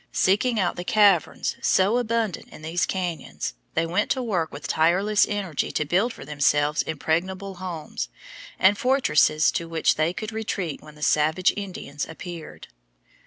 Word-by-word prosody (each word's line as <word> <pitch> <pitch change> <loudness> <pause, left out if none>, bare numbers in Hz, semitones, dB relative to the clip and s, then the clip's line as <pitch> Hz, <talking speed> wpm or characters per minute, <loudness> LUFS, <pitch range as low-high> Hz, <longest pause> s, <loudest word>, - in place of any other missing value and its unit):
Seeking 215 +5 +2
out 180 -3 0
the 175 - -4
caverns 200 -5 +3
so 200 +6 +3
abundant 230 -5 -1
in 155 - -13
these 165 +2 0
cañons, 180 -3 -3 0.2
they 165 - +2
went 180 +5 0
to 260 - 0
work 180 -9 -1
with 145 0 -7
tireless 190 +6 +3
energy 195 -7 -2
to 150 - 0
build 190 +10 +1
for - - -10
themselves 145 0 +2
impregnable 185 +5 -2
homes 160 - -5 0.5
and 195 +2 +4
fortresses 250 - +3
to 165 -1 -3
which 165 -1 +2
they 155 +2 +2
could 215 +4 -5
retreat 200 -8 -3
when 150 -1 -14
the 150 - -9
savage 155 +5 +3
Indians 185 -8 -5
appeared. 165 0 -9
180 Hz, 155 wpm, -24 LUFS, 155-205 Hz, 0.5 s, and